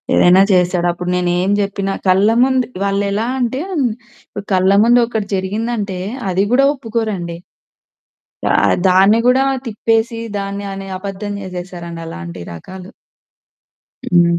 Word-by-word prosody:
ఏదైనా 180 +2 +6
చేశాడు. 180 -1 +2
అప్పుడు 175 +1 -5
నేనేం 180 +1 0
చెప్పినా, 200 -1 -2
కళ్ళ 190 +3 +4 0.2
ముందు 260 -1 +1 0.2
వాళ్ళెలా 200 +2 0
అంటే, 250 +3 -1 0.9
కళ్ళ 185 +1 +3
ముందొకటి 235 -3 +2
జరిగిందంటే, 205 0 -3 0.3
అది 195 +3 +1
కూడా 270 +2 +5
ఒప్పుకోరండి. 215 -9 -3 1.2
ఆహ్, - - +3 0.2
దాన్ని 195 +4 +5
కూడా 255 +2 +4 0.2
తిప్పేసి, 225 +1 0 0.2
దాన్ని 200 0 -4
అనే 195 0 -7
అబద్ధం 200 +1 -5
చేసేసారండి 175 -2 -7
అలాంటి 85 - -8
రకాలు. 185 - -10 1.2
హ్మ్. 170 -1 +4
195 Hz, 110 wpm, -17 LUFS, 180-220 Hz, 1.2 s, ఏదైనా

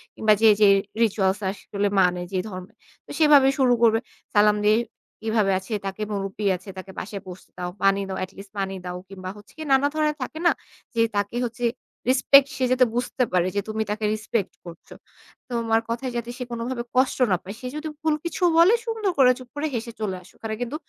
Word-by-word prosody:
কিংবা 215 -1 +4
যে, 225 - +7
যে 210 - +8 0.4
রিচুয়ালস 195 -2 +1
আসলে 200 +1 -3
মানে 180 -1 +3
যে 185 - 0
ধর্মে। 185 -1 -9 0.3
তো - - -11
সেভাবে 295 -3 +7
শুরু 250 -2 +5
করবে। 225 -1 +5 0.4
সালাম 210 0 +5
দিয়ে 215 +1 +5 0.4
কিভাবে 220 -3 +1
আছে, 190 +4 -7
তাকে 195 +2 -5
মুরুব্বি 200 +1 -4
আছে, 185 +3 -11
তাকে 190 +1 -8
বাসায় 200 0 -6
বসতে 180 0 -11
দাও। 180 0 -3
পানি 195 0 +4
দাও, 190 - -3
এট 185 - -6
লিস্ট 195 0 -11
পানি 195 0 -2
দাও। 180 0 -4
কিংবা 185 -1 -7
হচ্ছে 205 - -16 0.2
নানা 270 +2 +5
ধরনের 305 -1 +1
থাকে 315 +5 -5
না - - +6 0.4
যে 230 - +3
তাকে 205 +3 -1
হচ্ছে 240 +1 -3 0.4
রেসপেক্ট 275 +1 +6
সে 260 - -1
যাতে 255 0 +5
বুঝতে 250 +1 0
পারে 180 0 +3
যে 200 - +1
তুমি 220 0 -1
তাকে 210 0 -2
রিসপেক্ট 215 -2 -2
করছো। 170 -1 -11 0.6
তোমার 225 -2 +1
কথায় 245 +2 -2
যাতে 235 0 -4
সে 250 - -4
কোনভাবে 235 +1 -3
কষ্ট 260 +1 +3
না 180 - +4
পায়, 200 +3 -7
সে 250 - -5
যদি 305 +1 -4
ভুল 315 -1 +2
কিছুও 345 +1 +1
বলে 345 +7 +7
সুন্দর 445 -4 -1
করে 255 -2 +7
চুপ 250 -1 -12
করে 300 +2 -1
হেসে 235 0 -4
চলে 195 -3 -1
আসো। 180 - -19
ওখানে 220 -1 -4
কিন্তু 245 +4 -3
220 Hz, 200 wpm, -24 LUFS, 195-255 Hz, 0.6 s, যে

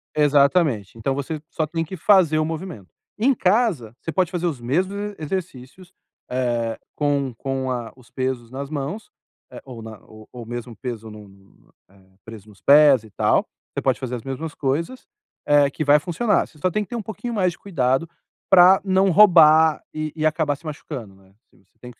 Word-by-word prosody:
Exatamente. 140 - +2
Então 125 +4 -1
você 145 +2 -4
só 160 - -2
tem 165 +1 -2
que 185 +4 -8
fazer 175 -3 +4
o 155 - +1
movimento. 160 - -6 0.3
Em 265 +5 +3
casa, 185 - +1
você 165 - -4
pode 180 0 0
fazer 175 -1 -3
os 150 -8 -2
mesmos 180 +11 -1
e 205 0 -5
exercícios, 175 +1 -6 0.4
eh, 120 -3 -2 0.2
com 140 -3 0
com 135 0 -3
a 120 -2 -4
os 125 -2 -20
pesos 130 -3 -3
nas 140 +2 -6
mãos, 155 - -5 0.4
eh, - - -10
ou 125 -4 -10
na 110 -1 -10
o 110 0 -15
ou 120 -2 -9
mesmo 120 0 -7
peso 115 -3 -7
num, 105 -1 -12 0.6
eh, 95 -1 -25
preso 110 -2 -11
nos 100 - -19
pés, 140 -4 +6
e 110 - -16
tal. - - +1 0.3
Você - - -3
pode - - 0
fazer 125 -1 -4
as 115 - -8
mesmas 145 +4 -6
coisas, 165 - -3 0.4
eh, 145 -1 +4
que 155 - -4
vai 145 +1 +5
funcionar, 185 +6 0
você - - -22
só 180 +5 -1
tem 210 +4 -1
que - - -15
ter 240 - -5
um 235 - -3
pouquinho 230 +3 -6
mais 185 -4 +1
de 170 - -15
cuidado 135 -4 -1 0.4
para 185 0 +7
não 190 0 +3
roubar 160 -5 +6
e 155 -1 -4
e 155 -1 -2
acabar 155 -2 +1
se 165 - -21
machucando, 140 -8 -7
né, 95 0 -24
assim, - - -28
você - - -42
tem 125 0 -11
que - - -23
145 Hz, 200 wpm, -22 LUFS, 125-175 Hz, 0.6 s, para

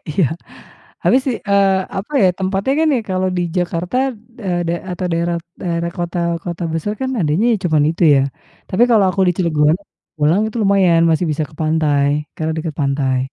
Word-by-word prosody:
Iya, 170 +3 +2 0.8
habis 260 - +4
sih, 250 -4 0
eee, 200 -1 +4 0.2
apa 220 +10 -7
ya, 185 - +6
tempatnya 195 +6 0
kan 320 - +3
ya - - 0
kalau 185 0 0
di 175 - +1
Jakarta, 175 +4 -1 0.5
eee, 175 -2 0
da 170 - +1 0.2
atau 180 +1 -3
daerah 170 +1 0 0.2
daerah 170 -1 -2
kota 175 0 -3 0.3
kota 175 0 -5
besar 165 +6 -2
kan 260 0 -1
adanya 160 +7 +1
ya - - +2
cuman 155 -4 +3
itu 165 - -4
ya. 135 - +4 0.5
Tapi 205 +6 +1
kalau 215 -4 +5
aku 195 - -2
di 180 - +3
Cilegon, 155 -3 +2 0.4
pulang 155 +5 +2
itu 220 - -6
lumayan 190 -4 +4
masih 160 +2 +1
bisa 150 +1 -1
ke 155 - -18
pantai 150 -3 +2 0.3
karena 160 0 -2
dekat 160 -2 -4
pantai. 135 -2 0
175 Hz, 185 wpm, -18 LUFS, 155-195 Hz, 0.8 s, ya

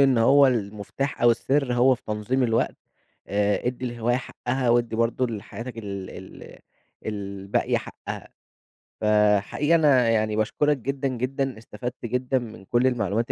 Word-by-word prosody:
إن 135 -3 +5
هو 140 +4 +6
المفتاح 110 +3 -2
أو 120 - +7
السر 130 +2 +1
هو 130 +2 +5
في - - -14
تنظيم 110 +5 -1
الوقت، 115 -2 +1 0.5
آآ 105 +3 +1
ادِّي 125 +1 -3
الهواية 120 0 0
حقها، 125 0 -2
وادِّي 120 -1 +2
برضه 115 +2 +1
لحياتك 115 +2 -7
ال 100 -3 -6
ال - - -11 0.5
الباقية 100 -2 -1
حقها. - - -8 0.7
فحقيقي 105 +8 +3
أنا 135 -7 +4
يعني 110 -1 +1
باشكرك 145 +7 +1
جدًا 135 +2 -2
جدًا، 130 0 -2
استفدت 120 +2 -7
جدًا 125 +2 0
من 110 -5 -10
كل 120 +5 +2
المعلومات 115 -2 0
120 Hz, 140 wpm, -25 LUFS, 110-130 Hz, 0.7 s, أو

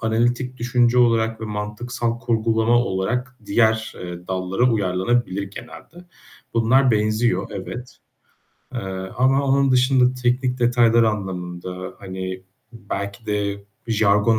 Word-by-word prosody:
analitik 120 +3 0
düşünce 120 0 +2
olarak 115 -2 +2
ve - - -4
mantıksal 115 +3 -3
kurgulama 115 0 +2
olarak 120 +4 -1
diğer, 110 +1 +2
eee, 90 0 -8
dallara, 95 +6 +1
uyarlanabilir 100 +1 0
genelde. 170 - -11 0.5
Bunlar 125 +3 +4
benziyor, 110 -2 +1
evet, 120 +6 -7 0.8
eee, 120 - -2 0.4
ama 135 +2 +3
onun 135 0 +3
dışında 130 0 +4
teknik 125 +1 +1
detaylar 120 -1 +4
anlamında, 90 -3 -3
hani 95 -1 -6 0.3
belki 100 0 -6
de 100 -1 -2 0.2
jargon 110 0 +3
115 Hz, 110 wpm, -22 LUFS, 100-120 Hz, 0.8 s, Bunlar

